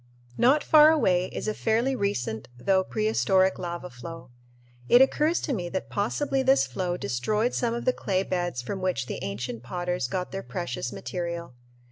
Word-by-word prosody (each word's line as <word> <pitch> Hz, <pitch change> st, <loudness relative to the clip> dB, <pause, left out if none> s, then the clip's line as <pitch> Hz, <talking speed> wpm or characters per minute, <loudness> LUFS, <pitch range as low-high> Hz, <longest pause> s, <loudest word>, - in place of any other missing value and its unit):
Not 270 Hz, -, +4 dB
far 305 Hz, 0 st, +7 dB
away 185 Hz, -, +2 dB
is -, -, -5 dB
a 215 Hz, -, 0 dB
fairly 230 Hz, +5 st, +1 dB
recent 160 Hz, -, -2 dB
though 190 Hz, +9 st, +2 dB
prehistoric 195 Hz, -3 st, +1 dB
lava 175 Hz, 0 st, -5 dB
flow. 125 Hz, +1 st, -10 dB, 0.6 s
It 245 Hz, -, +8 dB
occurs 300 Hz, +5 st, +3 dB
to 285 Hz, -, -2 dB
me 175 Hz, -6 st, -3 dB
that 190 Hz, -, -4 dB
possibly 270 Hz, +7 st, 0 dB
this 265 Hz, +1 st, +4 dB
flow 180 Hz, -2 st, -3 dB
destroyed 210 Hz, -, -1 dB
some 235 Hz, -1 st, 0 dB
of 235 Hz, -, -5 dB
the 255 Hz, -, +3 dB
clay 190 Hz, -5 st, -1 dB
beds 175 Hz, -9 st, -2 dB
from 190 Hz, +9 st, -4 dB
which 180 Hz, -9 st, -1 dB
the -, -, -5 dB
ancient 115 Hz, +3 st, -4 dB
potters 175 Hz, +2 st, -2 dB
got 180 Hz, +7 st, -3 dB
their 195 Hz, -, -4 dB
precious 175 Hz, -11 st, -4 dB
material. 170 Hz, -, -5 dB
185 Hz, 170 wpm, -26 LUFS, 170-230 Hz, 0.6 s, It